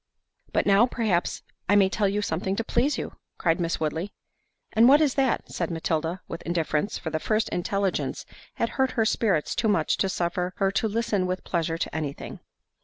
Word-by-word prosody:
"But - - +1
now, 200 +4 +5
perhaps, 215 -9 -1 0.3
I 205 - +5
may 200 -2 +6
tell 200 +1 +1
you 205 +1 -1
something 190 +2 -1
to 230 - -1
please 250 +6 +1
you," - - -6 0.2
cried 165 -1 +1
Miss 170 -1 -1
Woodley. 160 +6 -2 0.6
"And 230 +3 +6
what 285 +2 +7
is 295 -4 +3
that?" 270 -3 +1
said 170 - -2
Matilda, 165 +1 -2
with 165 - -6
indifference; 165 +2 -1
for 160 - -5
the 155 - -1
first 215 +5 0
intelligence 195 +2 -1 0.3
had - - 0
hurt 265 -1 0
her 225 - +3
spirits 195 -8 +1
too 225 - 0
much 180 -7 +2
to 195 - +1
suffer 180 0 -1
her 195 -1 +2
to 200 +3 +1
listen 210 -3 0
with 185 0 -3
pleasure 165 -2 -1
to 165 - -3
anything. 150 -3 -5
190 Hz, 190 wpm, -26 LUFS, 165-220 Hz, 0.6 s, what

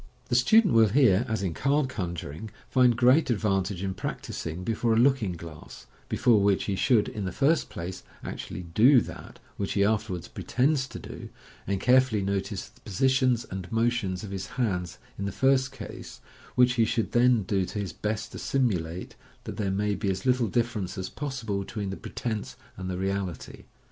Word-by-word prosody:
The - - +1
student 205 - +5
will 115 -1 +6
here, 115 -2 +4
as 110 -3 -1
in 90 -4 -1
card 140 - +1
conjuring, 85 - -5 0.2
find 125 -2 +4
great 130 +6 +5
advan 100 -5 +1
tage 95 -1 -5
in 95 -1 -1
practising 85 -1 -5
before 115 +2 +1
a - - +2
looking 120 -6 +3
glass, 80 -2 -10 0.2
before 115 -4 +3
which 100 -1 +2
he 100 - -1
should, 105 +2 +3
in 105 -2 -4
the 95 - -2
first 145 - +2
place, 90 +2 -6 0.2
actually 90 - -6
do 115 - +5
that - - -9 0.2
which 100 - -2
he 100 - +3
afterwards 105 -5 -1
pretends 130 +1 0
to - - -8
do, - - -9 0.4
and 100 0 0
carefully 125 -3 +3
notice 100 0 -2
the - - -25
positions 125 +2 +2
and 95 -2 -6
motions 115 -5 0
of 100 - -7
his 95 -1 -4
hands 95 -9 -2 0.2
in 100 - -2
the 100 - -2
first 135 +3 +2
case, - - -9 0.4
which 125 0 +5
he - - +6
should 115 0 -1
then 120 -2 +4
do 95 0 0
his 100 -3 -4
best 105 +1 -3
to - - -7
simulate, 90 -10 -1 0.3
that - - -7
there 100 -2 -1
may 105 +2 0
be 100 0 -2
as 95 +3 -2
little 125 -2 +3
difference 110 -3 -1
as 95 -1 -4
possible 130 -8 -3
between 100 0 -4
the - - -4
pretence 110 0 -5 0.2
and 95 0 -5
the 90 - -3
reality. 95 -2 -4
105 Hz, 185 wpm, -27 LUFS, 95-125 Hz, 0.4 s, will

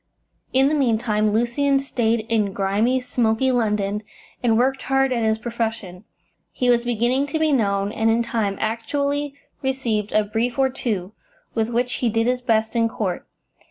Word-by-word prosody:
In 265 +1 +4
the 295 - +1
meantime, 220 -6 +1
Lucian 240 +6 +2
stayed 235 -4 0
in 215 -3 0
grimy, 205 +7 +1
smoky 245 0 +1
London, 210 -4 0 0.4
and 230 -2 +3
worked 265 +3 +1
hard 270 0 +1
at 235 -2 0
his 220 0 +2
profession. 225 -5 -4 0.5
He 250 -1 +1
was 235 -1 +2
beginning 245 +4 +1
to 315 - -2
be 315 -1 +2
known, 200 -6 +1
and 225 +1 +1
in 230 +1 +2
time 215 -4 -1
actually 280 +6 -1 0.3
received 240 -6 -1
a 215 - +3
brief 225 +4 -2
or 265 -1 +2
two, 205 -7 -3 0.4
with 225 0 0
which 245 +1 0
he 240 - +2
did 225 +1 +1
his 250 +1 0
best 220 -2 +1
in 230 -1 +2
court. 200 -5 -3
230 Hz, 165 wpm, -22 LUFS, 220-255 Hz, 0.5 s, In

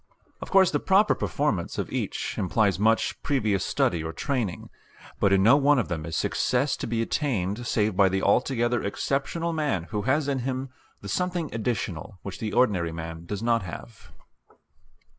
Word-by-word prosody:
Of - - -7
course 190 -2 +5
the - - +1
proper 200 +3 +4
performance 140 - -1
of - - -3
each - - -3
implies 100 0 +1
much 110 +2 +1
previous 110 -9 0
study 85 -2 0
or 80 - -4
training, 120 -7 -3 0.5
but 100 - +3
in 95 -1 +4
no 115 +7 +7
one 145 0 +4
of 120 - 0
them 80 -3 -3
is 80 - -3
success 130 +2 +1
to - - -4
be 115 0 0
attained 115 - -2
save 105 -3 +1
by 95 0 +5
the 95 +1 -1
altogether 120 +2 +2
exceptional 140 +10 -2
man 150 - -1
who 105 -2 -1
has 135 +6 +1
in 140 -2 0
him 130 +1 -3 0.3
the 100 - -8
something 175 - -2
additional 105 -5 -3
which 100 - -7
the 110 -2 -3
ordinary 95 -9 +2
man 80 0 -7
does 105 +3 -4
not 115 -1 +2
have. 100 +4 -10
115 Hz, 175 wpm, -26 LUFS, 95-135 Hz, 0.5 s, no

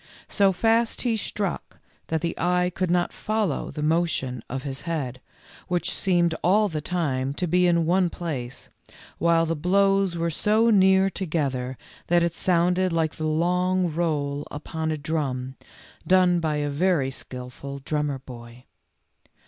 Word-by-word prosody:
So 200 -2 +3
fast 225 +5 +1
he 240 -3 +1
struck 205 -3 -4 0.3
that 160 -1 -1
the 170 0 -1
eye 180 +1 +1
could 185 -1 -1
not 175 0 +1
follow 215 -8 -1
the 150 - -5
motion 155 -6 0
of 135 +1 -4
his 140 -1 -4
head, 130 -6 -3 0.5
which 175 -2 -1
seemed 175 -3 +2
all 205 +4 +4
the 155 -3 -3
time 140 -6 -1
to 180 - -1
be 180 +1 +3
in 170 -1 +3
one 180 +1 +2
place, 135 -9 -6 0.5
while 165 0 +3
the 165 0 -1
blows 195 +2 +2
were 170 0 -1
so 215 +7 +3
near 190 -1 +5
together 135 -9 -2 0.3
that 175 0 +3
it 170 -1 0
sounded 180 +1 +2
like 160 -1 0
the 155 - -2
long 180 +2 +1
roll 145 -4 -1
upon 160 +2 -4
a 155 - -1
drum, 140 -4 -3 0.5
done 180 -2 +4
by 155 -2 -1
a 145 0 -1
very 150 -3 +1
skilful 130 +2 -8
drummer 145 0 -2
boy. 120 -2 -12
170 Hz, 150 wpm, -25 LUFS, 145-180 Hz, 0.5 s, near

